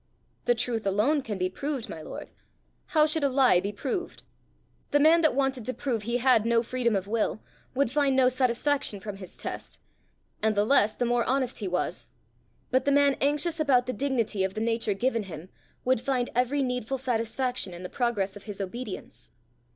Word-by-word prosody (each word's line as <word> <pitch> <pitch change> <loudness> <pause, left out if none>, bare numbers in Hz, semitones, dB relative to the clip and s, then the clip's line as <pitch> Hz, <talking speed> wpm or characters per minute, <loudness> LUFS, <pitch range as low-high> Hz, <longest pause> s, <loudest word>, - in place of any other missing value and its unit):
"The 240 - +3
truth 225 -2 -1
alone 225 +10 +2
can 215 -6 -4
be 185 0 0
proved, 275 +6 -4
my 160 - -7
lord; - - -8 0.6
how 305 -2 +4
should 310 0 -1
a 280 - +3
lie 255 -8 +5
be 200 +3 -3
proved? 290 - -4 0.7
The 290 - +3
man 320 +3 +6
that 310 -6 +3
wanted 270 -3 0
to 255 - -3
prove 245 -6 -2
he 235 +3 -1
had 250 -3 +4
no 230 0 +2
freedom 235 -2 0
of 195 -1 -1
will, 215 +1 -1 0.4
would 270 -3 +1
find 280 -1 +2
no 260 -1 +5
satisfaction 255 -2 +1
from 205 0 -7
his 185 -2 -11
test - - -6 0.6
and 220 -1 +2
the 205 +1 +3
less 215 -4 +4
the 245 - 0
more 240 0 +2
honest 260 -1 0
he 205 - -3
was; 180 0 -2 0.6
but 260 0 +2
the 280 - +3
man 280 -1 +4
anxious 300 +4 +1
about 265 -5 +3
the 255 - -3
dignity 240 -8 0
of 190 0 -2
the - - -2
nature 225 -2 0
given 230 0 0
him, 165 +2 -8 0.4
would 255 -2 +2
find 250 -2 -1
every 255 +4 +1
needful 250 0 -2
satisfaction 245 -2 -1
in 175 +1 -9
the - - -4
progress 210 -4 -1
of 205 - -11
his 205 -2 -7
obedience." 195 - -6
245 Hz, 195 wpm, -27 LUFS, 210-270 Hz, 0.7 s, man